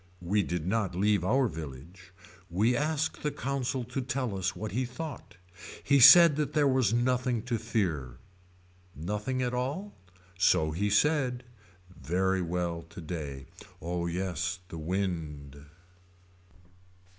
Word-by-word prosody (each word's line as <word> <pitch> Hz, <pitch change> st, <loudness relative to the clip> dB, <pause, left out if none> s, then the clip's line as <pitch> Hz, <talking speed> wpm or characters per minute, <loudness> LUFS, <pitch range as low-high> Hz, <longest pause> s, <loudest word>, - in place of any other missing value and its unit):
We 100 Hz, +4 st, +2 dB
did 90 Hz, -4 st, -3 dB
not 100 Hz, -2 st, -1 dB
leave 100 Hz, 0 st, +2 dB
our 130 Hz, +7 st, +2 dB
village. 80 Hz, -, -9 dB, 0.4 s
We 105 Hz, +8 st, +2 dB
asked 155 Hz, +2 st, -1 dB
the 150 Hz, -, 0 dB
consul 135 Hz, -3 st, -2 dB
to 125 Hz, +3 st, -4 dB
tell 125 Hz, -4 st, -2 dB
us 95 Hz, 0 st, -2 dB
what 110 Hz, 0 st, -5 dB
he 125 Hz, +5 st, 0 dB
thought. 135 Hz, +3 st, -7 dB, 0.5 s
He 140 Hz, -1 st, +4 dB
said 165 Hz, +3 st, +9 dB
that 150 Hz, -1 st, -1 dB
there 145 Hz, -1 st, +3 dB
was 130 Hz, -6 st, +2 dB
nothing 125 Hz, -1 st, +1 dB
to 120 Hz, -2 st, -2 dB
fear. 80 Hz, -, -2 dB, 0.8 s
Nothing 105 Hz, -, -2 dB
at 125 Hz, 0 st, -1 dB
all. 140 Hz, +12 st, -3 dB, 0.5 s
So 80 Hz, -4 st, +3 dB
he 100 Hz, +6 st, -1 dB
said. 125 Hz, +2 st, +2 dB, 0.5 s
Very 95 Hz, +3 st, 0 dB
well 85 Hz, -1 st, -2 dB
today. 75 Hz, -6 st, -6 dB, 0.3 s
Oh 85 Hz, +1 st, -3 dB
yes 90 Hz, +1 st, -2 dB
the 80 Hz, -, -7 dB
wind. 75 Hz, -5 st, -4 dB
100 Hz, 130 wpm, -29 LUFS, 85-130 Hz, 0.8 s, said